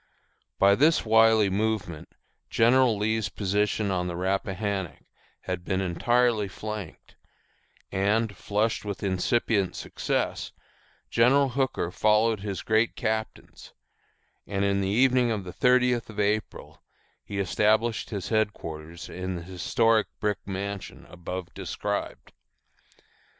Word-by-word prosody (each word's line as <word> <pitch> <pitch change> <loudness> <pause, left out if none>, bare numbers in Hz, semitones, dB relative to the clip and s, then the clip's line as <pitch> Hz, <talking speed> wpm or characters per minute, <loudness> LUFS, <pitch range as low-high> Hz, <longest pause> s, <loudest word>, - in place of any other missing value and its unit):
By 100 +1 +5
this 150 +8 +3
wily 110 -1 +5
movement 100 -6 -2 0.3
General 120 0 +4
Lee's 110 0 0
position 105 +1 0
on 90 -1 -1
the 85 - -4
Rappahannock 95 -1 -2 0.4
had 90 -1 -4
been 95 +1 -1
entirely 110 +4 +1
flanked; 105 -2 -8 0.8
and, 105 +2 +1
flushed 105 +2 -1
with 100 -2 -5
incipient 100 +1 0
success, - - -3 0.6
General 135 +4 +4
Hooker 130 -9 -1
followed 110 +2 +2
his 100 -1 -5
great 110 +1 +2
captains, 110 -1 -4 0.7
and 100 0 -1
in 100 0 +1
the 95 - -1
evening 125 +3 +3
of 110 -3 -2
the 90 -1 -8
thirtieth 125 -2 +2
of 105 -1 -8
April 105 +1 -2 0.4
he 100 - -6
established 110 +4 +1
his 100 -5 -4
headquarters 85 -7 -3
in 95 0 -5
the 85 - -6
historic 105 +5 +1
brick 105 -1 -1
mansion 100 0 -5
above 90 +1 -6
described. - - -4
105 Hz, 115 wpm, -26 LUFS, 95-115 Hz, 0.8 s, By